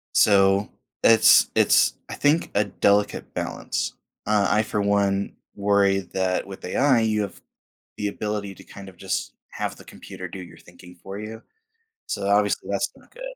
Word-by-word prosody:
So, 100 Hz, 0 st, +4 dB, 0.3 s
it's 115 Hz, -1 st, +6 dB
it's -, -, +4 dB, 0.2 s
I -, -, -5 dB
think, 150 Hz, +3 st, +1 dB
a 105 Hz, -, +4 dB
delicate 100 Hz, +1 st, 0 dB
balance. -, -, -3 dB, 0.3 s
Uh, 105 Hz, -2 st, +2 dB
I 105 Hz, +1 st, +2 dB
for 105 Hz, -1 st, -2 dB
one 100 Hz, -1 st, 0 dB, 0.2 s
worry 100 Hz, -1 st, +2 dB
that 95 Hz, -1 st, 0 dB
with 95 Hz, -1 st, -10 dB
AI 130 Hz, +5 st, +2 dB
you 110 Hz, -1 st, +1 dB
have 100 Hz, -, -6 dB, 0.6 s
the 105 Hz, -, -2 dB
ability 100 Hz, -1 st, -4 dB
to -, -, -14 dB
kind 100 Hz, -1 st, -12 dB
of 95 Hz, -, -14 dB
just 95 Hz, +2 st, -4 dB, 0.2 s
have -, -, -4 dB
the -, -, -15 dB
computer 90 Hz, -1 st, -10 dB
do 95 Hz, -, -8 dB
your 85 Hz, -, -13 dB
thinking 90 Hz, +1 st, -16 dB
for 95 Hz, +1 st, -7 dB
you, 110 Hz, +1 st, -8 dB, 0.6 s
so 100 Hz, -1 st, -3 dB
obviously 100 Hz, 0 st, +1 dB
that's -, -, -1 dB
not -, -, -21 dB
good. -, -, -11 dB
100 Hz, 165 wpm, -24 LUFS, 95-105 Hz, 0.6 s, it's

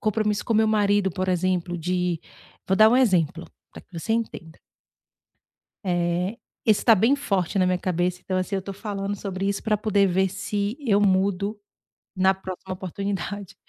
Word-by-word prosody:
compromisso 215 Hz, -1 st, 0 dB
com -, -, -1 dB
o -, -, +3 dB
meu 220 Hz, 0 st, +4 dB
marido, 205 Hz, -2 st, +2 dB
por 185 Hz, +1 st, -3 dB
exemplo, 180 Hz, -1 st, 0 dB
de, 180 Hz, 0 st, -1 dB, 0.5 s
vou 190 Hz, -, +2 dB
dar 215 Hz, +2 st, +7 dB
um 245 Hz, -, +4 dB
exemplo 175 Hz, -, +2 dB, 0.3 s
para -, -, -10 dB
que -, -, -37 dB
você 195 Hz, +7 st, -2 dB
entenda. 205 Hz, -8 st, -4 dB, 1.3 s
Eh, 175 Hz, +2 st, 0 dB, 0.3 s
esse 215 Hz, -2 st, +4 dB
está 230 Hz, -, +6 dB
bem 225 Hz, +8 st, +3 dB
forte 200 Hz, -, -1 dB
na 185 Hz, -, +3 dB
minha 180 Hz, 0 st, +2 dB
cabeça. 180 Hz, 0 st, -1 dB
Então 185 Hz, -, -1 dB
assim, 185 Hz, +2 st, -1 dB
eu 195 Hz, -, -1 dB
tô 195 Hz, +1 st, -7 dB
falando 200 Hz, 0 st, -4 dB
sobre 195 Hz, -1 st, -4 dB
isso 200 Hz, 0 st, -2 dB
para 215 Hz, -1 st, +1 dB
poder 205 Hz, -2 st, +2 dB
ver 190 Hz, +1 st, +2 dB
se 205 Hz, +3 st, -3 dB
eu 220 Hz, -8 st, +2 dB
mudo 200 Hz, +1 st, +1 dB, 0.6 s
na 190 Hz, 0 st, +4 dB
próxima 190 Hz, 0 st, -7 dB
oportunidade. 195 Hz, +1 st, -5 dB
195 Hz, 175 wpm, -24 LUFS, 180-210 Hz, 1.3 s, dar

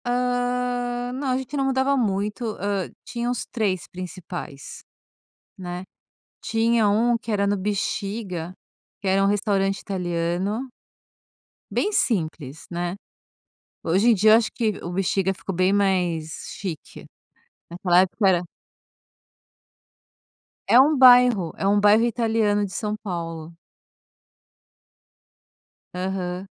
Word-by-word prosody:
Ah, 245 Hz, 0 st, -1 dB
não, 270 Hz, +2 st, -4 dB
a 255 Hz, -, +1 dB
gente 265 Hz, +2 st, -6 dB
não 275 Hz, -1 st, 0 dB
mudava 270 Hz, +1 st, +1 dB
muito, 210 Hz, -2 st, -1 dB, 0.2 s
hã, 200 Hz, -2 st, -2 dB, 0.2 s
tinha 240 Hz, 0 st, -3 dB
uns 245 Hz, -, -2 dB
3 200 Hz, -6 st, -2 dB
principais, 175 Hz, -5 st, -8 dB, 0.7 s
né. 180 Hz, 0 st, -6 dB, 0.6 s
Tinha 225 Hz, -1 st, +2 dB
um 230 Hz, +4 st, +3 dB
que 230 Hz, -, -5 dB
era 200 Hz, -1 st, +1 dB
no 205 Hz, 0 st, +1 dB
Bixiga, 195 Hz, -2 st, -3 dB, 0.5 s
que 195 Hz, -, -3 dB
era 195 Hz, +1 st, +3 dB
um -, -, +4 dB
restaurante 200 Hz, -1 st, +1 dB
italiano 180 Hz, +5 st, -2 dB, 1.0 s
bem -, -, 0 dB
simples 160 Hz, -, -1 dB
,né. 175 Hz, +1 st, -3 dB, 0.8 s
Hoje 190 Hz, +8 st, +2 dB
em -, -, +7 dB
dia 215 Hz, +1 st, +4 dB
eu -, -, +9 dB
acho 230 Hz, -2 st, -1 dB
que 225 Hz, -3 st, 0 dB
o 175 Hz, -, -5 dB
Bixiga 190 Hz, +1 st, 0 dB
ficou 195 Hz, 0 st, -6 dB
bem 185 Hz, +2 st, +2 dB
mais 180 Hz, -6 st, 0 dB
chique. 180 Hz, -6 st, -7 dB, 0.6 s
Naquela 175 Hz, +1 st, +3 dB
época 195 Hz, +2 st, +1 dB
era 175 Hz, -1 st, +2 dB, 2.2 s
É 240 Hz, -, +7 dB
um 290 Hz, +3 st, +5 dB
bairro, 245 Hz, -8 st, +6 dB
é 195 Hz, -, -1 dB
um 205 Hz, +1 st, +4 dB
bairro 210 Hz, +2 st, +5 dB
italiano 225 Hz, -3 st, +1 dB
de 195 Hz, -, -8 dB
São 210 Hz, -1 st, -2 dB
Paulo. 170 Hz, -5 st, -6 dB, 2.4 s
Aham. 180 Hz, 0 st, -3 dB
200 Hz, 120 wpm, -23 LUFS, 180-235 Hz, 2.4 s, eu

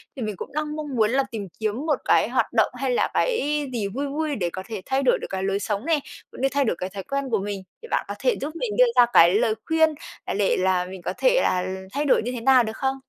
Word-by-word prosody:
Thì 265 Hz, -, -7 dB
mình 215 Hz, -3 st, -3 dB
cũng 185 Hz, -, -8 dB
đang 300 Hz, 0 st, -2 dB
mong 300 Hz, -3 st, -5 dB
muốn 220 Hz, -2 st, +3 dB
là 270 Hz, +2 st, +2 dB
tìm 210 Hz, -4 st, -5 dB
kiếm 220 Hz, +6 st, -2 dB
một 310 Hz, -, +1 dB
cái -, -, +3 dB
hoạt -, -, 0 dB
động -, -, +3 dB
hay 260 Hz, +1 st, -1 dB
là 245 Hz, -, +1 dB
cái 300 Hz, -, 0 dB
gì 215 Hz, -4 st, -1 dB
vui 270 Hz, +8 st, -3 dB
vui 300 Hz, +1 st, -2 dB
để 180 Hz, -7 st, -1 dB
có 185 Hz, +2 st, -7 dB
thể 215 Hz, -4 st, -6 dB
thay 270 Hz, +1 st, 0 dB
đổi 260 Hz, -, +3 dB
được -, -, -6 dB
cái 190 Hz, 0 st, -3 dB
lối 195 Hz, +1 st, 0 dB
sống 205 Hz, +3 st, -3 dB
nè, 320 Hz, -2 st, +2 dB, 0.3 s
cũng -, -, -10 dB
như 270 Hz, -, +3 dB
thay 280 Hz, +1 st, +1 dB
đổi 220 Hz, -, 0 dB
cái 185 Hz, -, -3 dB
thói 195 Hz, 0 st, -7 dB
quen 275 Hz, +2 st, -3 dB
của 220 Hz, -, +2 dB
mình, 200 Hz, -1 st, -4 dB, 0.2 s
thì 465 Hz, -, -10 dB
bạn -, -, 0 dB
có -, -, -5 dB
thể -, -, +2 dB
giúp 300 Hz, +4 st, -4 dB
mình 435 Hz, +6 st, -3 dB
đưa -, -, +7 dB
ra 245 Hz, -, +9 dB
cái 170 Hz, +3 st, +7 dB
lời 220 Hz, 0 st, +2 dB
khuyên, 320 Hz, 0 st, +4 dB, 0.4 s
à, -, -, -3 dB
để 200 Hz, -1 st, +1 dB
là 185 Hz, -1 st, +2 dB
mình 185 Hz, 0 st, -9 dB
có 180 Hz, -, -3 dB
thể -, -, +3 dB
là 180 Hz, 0 st, +1 dB, 0.3 s
thay 290 Hz, +1 st, -1 dB
đổi 280 Hz, -, +4 dB
như 245 Hz, -, -3 dB
thế 245 Hz, -2 st, -5 dB
nào 255 Hz, 0 st, +5 dB
được 220 Hz, 0 st, -5 dB
không? 265 Hz, 0 st, 0 dB
245 Hz, 290 wpm, -24 LUFS, 200-290 Hz, 0.4 s, ra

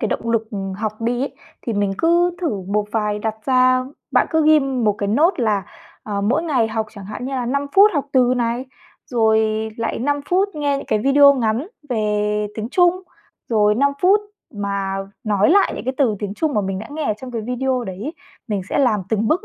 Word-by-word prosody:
cái 220 Hz, -, 0 dB
động 230 Hz, -, -2 dB
lực, 225 Hz, -1 st, 0 dB
ừm, 195 Hz, -2 st, -4 dB
học 215 Hz, +2 st, -4 dB
đi 240 Hz, +2 st, -1 dB
ấy. 280 Hz, -, -4 dB, 0.3 s
Thì 230 Hz, -, -3 dB
mình 205 Hz, -1 st, 0 dB
cứ 345 Hz, +1 st, +2 dB
thử 225 Hz, -, -1 dB
một 210 Hz, +1 st, +1 dB
vài 210 Hz, -2 st, 0 dB
đặt 220 Hz, +1 st, -2 dB
ra 255 Hz, 0 st, +4 dB, 0.3 s
bạn -, -, +4 dB
cứ 320 Hz, -2 st, +2 dB
ghim 275 Hz, -5 st, +3 dB
một 210 Hz, -, +4 dB
cái 200 Hz, -, -1 dB
note 295 Hz, -, +2 dB
là, 205 Hz, -3 st, +1 dB, 0.4 s
ờ, 205 Hz, -2 st, -3 dB
mỗi 245 Hz, +11 st, +1 dB
ngày 270 Hz, -9 st, +1 dB
học 220 Hz, 0 st, -2 dB
chẳng 200 Hz, -3 st, -10 dB
hạn 215 Hz, +5 st, -7 dB
như 270 Hz, -, -4 dB
là 250 Hz, -2 st, -2 dB
5 280 Hz, +3 st, -1 dB
phút 405 Hz, +2 st, +7 dB
học 285 Hz, -2 st, 0 dB
từ 255 Hz, -1 st, +4 dB
này, 240 Hz, +1 st, -1 dB, 0.4 s
rồi 220 Hz, -1 st, +1 dB
lại 230 Hz, -1 st, -2 dB
5 285 Hz, +4 st, 0 dB
phút 380 Hz, +3 st, +2 dB
nghe 290 Hz, -2 st, 0 dB
những 275 Hz, -, -7 dB
cái 215 Hz, -, +1 dB
video 280 Hz, +4 st, +6 dB
ngắn 235 Hz, +2 st, 0 dB, 0.2 s
về 210 Hz, -2 st, 0 dB
tiếng 220 Hz, +1 st, -4 dB
Trung, 355 Hz, +3 st, +3 dB, 0.5 s
rồi 210 Hz, -2 st, +3 dB
5 280 Hz, +4 st, +2 dB
phút 390 Hz, +3 st, +5 dB, 0.3 s
mà 200 Hz, -1 st, -2 dB, 0.3 s
nói 210 Hz, +1 st, +2 dB
lại 400 Hz, +3 st, +4 dB
những -, -, -6 dB
cái 260 Hz, +1 st, -2 dB
từ 235 Hz, -7 st, +2 dB
tiếng 205 Hz, -1 st, -4 dB
Trung 310 Hz, +5 st, -1 dB
mà 210 Hz, -, +2 dB
mình 195 Hz, -1 st, -3 dB
đã 220 Hz, -, -7 dB
nghe 305 Hz, +1 st, -4 dB
ở 215 Hz, -, +1 dB
trong 260 Hz, -, -7 dB
cái 235 Hz, -2 st, -3 dB
video 250 Hz, +2 st, -1 dB
đấy 190 Hz, -2 st, -7 dB
ấy, 300 Hz, +7 st, -5 dB, 0.3 s
mình 200 Hz, -3 st, -1 dB
sẽ -, -, -1 dB
làm 245 Hz, -7 st, +3 dB
từng 220 Hz, 0 st, 0 dB
bước 360 Hz, -, +1 dB
230 Hz, 225 wpm, -20 LUFS, 210-280 Hz, 0.5 s, phút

